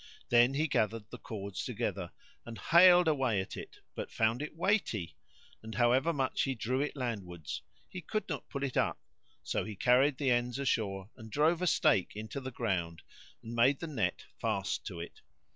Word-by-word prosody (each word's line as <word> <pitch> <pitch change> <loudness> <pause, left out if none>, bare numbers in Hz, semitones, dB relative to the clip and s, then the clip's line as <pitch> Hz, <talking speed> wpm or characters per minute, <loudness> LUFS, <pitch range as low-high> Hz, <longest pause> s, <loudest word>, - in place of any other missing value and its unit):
Then 120 +3 +5
he 155 +3 +2
gathered 110 -4 -1
the 125 - -8
cords 100 -3 -5
together 105 -7 -3 0.3
and 115 -1 -8
haled 175 - +7
away 130 -9 +2
at 95 - -4
it, - - -9
but - - -6
found 115 +3 +1
it 150 +1 -5
weighty; 165 - 0 0.5
and 110 0 -8
however 130 +6 +3
much 135 -4 0
he 135 -1 0
drew 125 +4 -1
it 150 - -2
landwards, 100 - -4 0.3
he 185 - -7
could 215 +7 -3
not 150 -6 -5
pull 140 - -4
it 135 -2 -2
up; - - +1 0.4
so - - -1
he 110 - -6
carried 130 +6 +4
the 135 -3 +1
ends 120 0 +1
ashore 105 -7 -1
and 110 -3 -11
drove 160 +7 +2
a 180 - +1
stake 150 - +3
into 110 +6 -5
the 130 - -5
ground 95 -9 -2 0.4
and 115 - -7
made 125 +4 +4
the - - -4
net 110 - -2
fast 100 -4 -1
to 90 -5 -6
it. 85 - -9
120 Hz, 185 wpm, -32 LUFS, 105-140 Hz, 0.5 s, haled